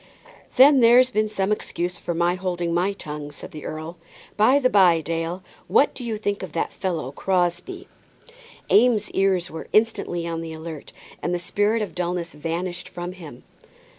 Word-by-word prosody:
"Then 275 +1 +7
there's 245 +2 +6
been 215 -1 +1
some 195 -1 -1
excuse 180 -4 -3
for 175 - -4
my 175 +1 +2
holding 175 -2 -2
my 180 +4 +1
tongue," 150 -5 -7
said 145 - -10
the 150 - -9
earl. 160 +2 -6 0.4
"By 220 +7 +5
the 270 -3 +3
by, 185 -7 +5
Dale, 165 +3 -3 0.2
what 285 - +3
do 255 - -8
you 225 -2 -3
think 205 -1 -2
of 185 -5 -7
that 165 - -2
fellow 170 -8 -3
Crosbie?" 185 - -1 0.8
Eames' 220 -2 +4
ears 190 -3 +1
were 160 0 -7
instantly 215 -6 +1
on 165 -1 -3
the 165 -1 -6
alert, 160 -1 -8 0.3
and 175 - -1
the - - 0
spirit 205 +5 0
of 205 - -6
dullness 175 -1 -3
vanished 170 +4 -4
from 175 0 -6
him. 165 -9 -11
180 Hz, 170 wpm, -23 LUFS, 165-210 Hz, 0.8 s, Then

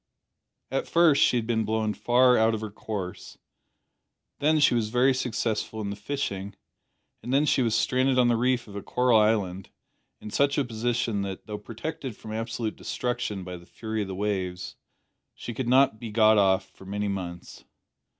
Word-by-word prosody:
At 135 - -1
first 165 -4 +4
she 125 - +4
had 115 - -1
been 110 -1 0
blown 110 0 -1
far 125 +2 +4
out 110 0 +3
of 110 - -5
her 110 -2 -5
course; 100 -3 -6 1.0
then 155 +2 +3
she 145 - +5
was 115 -3 0
very 125 +3 +3
successful 115 -3 -2
in 100 -2 -3
the - - -4
fishing, 100 -4 -4 0.7
and 125 - -6
then 140 +3 +3
she 140 - +2
was 115 -3 +1
stranded 130 +1 +2
on 125 -1 +5
the 120 - +3
reef 125 +1 +1
of 100 - -11
a 100 - -4
coral 125 +2 +3
island 100 -4 0 0.5
in 105 - -9
such 140 +5 +2
a 140 - +2
position 115 -2 -1
that, 95 -1 -5
though 105 -1 -6
protected 120 +3 -6
from 110 - -8
absolute 115 0 -3
destruction 120 -6 -3
by 90 0 -7
the 85 +1 -16
fury 110 0 -4
of 100 - -3
the 95 - -5
waves, 95 -3 -3 0.6
she 120 - -7
could 125 +2 -3
not 130 -3 +4
be 115 - -6
got 110 0 +5
off 95 -1 +3
for 95 - -16
many 105 +2 -2
months. 90 -3 -6
110 Hz, 185 wpm, -26 LUFS, 100-125 Hz, 1.0 s, she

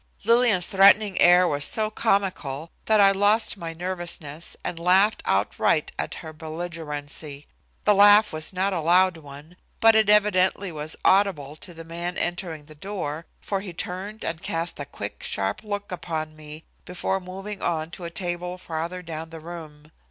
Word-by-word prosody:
Lillian's 230 -5 +4
threatening 200 0 +5
air 180 +1 +6
was 145 -3 -1
so 215 +5 0
comical 185 -9 -1 0.2
that 220 -1 +4
I 195 -1 +7
lost 205 +3 +3
my 170 -4 -6
nervousness 170 -3 -5
and 165 - -4
laughed 190 +5 +3
outright 105 +8 +1
at - - -3
her 160 - -8
belligerency. 155 -3 -6 0.4
The 210 - +5
laugh 205 +1 +6
was 155 0 -3
not 190 +1 0
a 170 - -1
loud 180 +2 +4
one, 150 +3 -13 0.2
but 225 0 +7
it 220 -1 +3
evidently 200 -2 +3
was 155 0 -3
audible 185 -8 +2
to 180 - -9
the 165 0 -9
man 170 +2 -4
entering 175 -4 -3
the 155 - -14
door, 165 -2 -5
for 195 - -2
he 190 -2 -7
turned 190 +5 -5
and 165 0 -3
cast 165 0 -2
a 145 - -4
quick, 100 -5 -7
sharp 95 0 -2
look 205 -2 -5
upon 160 -3 -4
me 155 +1 -10 0.2
before 180 +1 -2
moving 195 +2 -7
on 160 -1 -2
to 180 - -9
a 170 - -4
table 180 0 -4
farther 170 +1 -5
down 160 -1 -6
the 165 0 -9
room. 155 -2 -10
175 Hz, 165 wpm, -24 LUFS, 155-195 Hz, 0.4 s, I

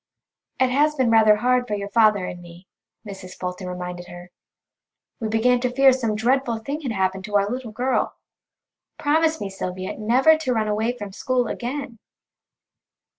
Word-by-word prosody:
"It 260 -1 +3
has 300 +3 +2
been 260 -5 +2
rather 220 -2 +6
hard 250 +3 +1
for 210 - -1
your 200 0 -5
father 215 -4 +3
and 175 - -7
me," 175 +1 -14 0.4
Mrs. 190 -2 -9
Fulton 180 0 -5
reminded 180 0 -6
her; 175 0 -11 0.9
"we 225 - -2
began 235 +3 +2
to 250 0 0
fear 265 +1 +5
some 230 -4 -1
dreadful 240 +1 +1
thing 280 +8 -5
had 265 -6 -3
happened 190 -2 -1
to 210 -1 -5
our 200 0 +3
little 245 0 -5
girl. 250 +4 -1 0.8
Promise 320 +2 +1
me, 200 - -3
Sylvia, 185 0 -5
never 255 +9 +4
to 260 -5 -1
run 220 -2 0
away 220 +4 -1
from 205 -3 -7
school 250 +5 -1
again." 255 0 -5
225 Hz, 170 wpm, -23 LUFS, 195-255 Hz, 0.9 s, rather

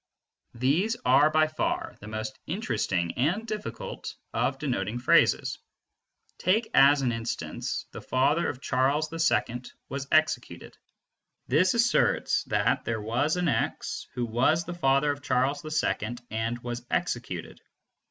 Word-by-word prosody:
These 160 - +1
are 135 +4 +6
by 155 0 +4
far 155 0 -2
the 105 - -11
most 110 +5 -5
interesting 110 - -1
and 175 - +1
difficult 215 -2 -6 0.2
of 135 - 0
denoting 120 -6 -2
phrases. 120 - +3 0.8
Take 215 +5 +1
as 140 +1 +6
an 125 - +2
instance 115 0 -4
"the - - -8
father 140 +6 +1
of 130 - -6
Charles 140 +5 +1
II 125 -7 +1 0.3
was 140 +1 -4
executed." - - +1 0.7
This 170 - +3
asserts 235 +1 +2
that - - +1
there 115 -1 -2
was 120 +10 0
an 180 -1 0
x 140 - -2
who 120 - -1
was 130 +9 +2
the 175 - -5
father 140 -3 +2
of 145 0 -6
Charles 135 +2 0
II 150 -7 -1
and 110 +2 -1
was 120 0 -4
executed. - - -3
135 Hz, 135 wpm, -27 LUFS, 120-155 Hz, 0.8 s, are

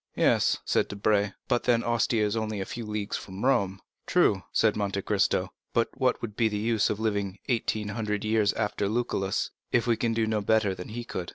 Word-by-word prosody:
"Yes," - - +3
said - - +2
Debray, 105 0 +1 0.2
"but 120 -2 +1
then 120 -2 +3
Ostia 115 -2 +1
is 105 +1 -1
only 110 -2 -2
a 95 - -2
few 115 +1 -6
leagues 105 -1 -2
from 95 +4 -6
Rome." 100 -8 +2 0.3
"True," 95 - +3
said 110 -2 +3
Monte 100 -2 -2
Cristo; 100 -2 +1 0.2
"but 115 -1 +2
what 130 -2 0
would 105 -3 -5
be 115 -1 +3
the 105 - -2
use 110 0 +1
of 105 - -2
living 100 -3 -1
eighteen 110 -3 0
hundred 105 -1 -2
years 110 -2 +3
after 105 -2 -1
Lucullus, 100 -4 -1 0.2
if 120 -2 +2
we 120 -1 +3
can 115 0 -1
do 115 -1 +2
no 110 -1 0
better 105 -1 +2
than 90 -1 -8
he 120 +2 -5
could?" 90 -7 -5
105 Hz, 205 wpm, -27 LUFS, 100-115 Hz, 0.3 s, Yes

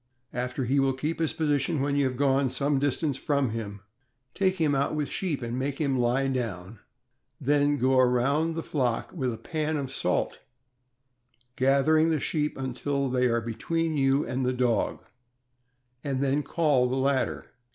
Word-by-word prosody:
After 125 +2 -2
he 135 +4 +2
will 135 -1 +2
keep 150 +6 -3
his 160 -2 +1
posi 150 -3 +1
tion 150 +3 -1
when 140 +1 0
you 140 -1 +2
have 130 -1 -2
gone 135 -1 +2
some 140 +2 0
distance 145 0 0
from 140 -5 0
him, 105 -3 -5 0.5
take 190 -1 +1
him 155 -4 +2
out 140 +2 0
with 150 -2 -2
sheep 155 -9 -2
and 120 +2 -3
make 140 +1 -2
him 140 -4 +1
lie 125 +3 +2
down; 115 -6 -4 0.6
then 145 +1 +2
go 130 0 +3
around 135 +6 +2
the 165 - -3
flock 125 -6 -1
with 130 -8 -1
a 115 - -5
pan 155 0 -2
of 135 -2 -4
salt, - - -1 1.2
gathering 140 +5 +3
the 160 -2 +1
sheep 150 +1 -1
until 135 +1 -2
they 125 0 +2
are 115 -1 +1
between 160 +9 -2
you 135 0 +2
and 130 +1 -2
the 125 0 +1
dog; 125 -2 0 1.0
then 140 +1 0
call 145 -4 +2
the 130 - -1
latter. 135 0 0
135 Hz, 170 wpm, -27 LUFS, 125-150 Hz, 1.2 s, go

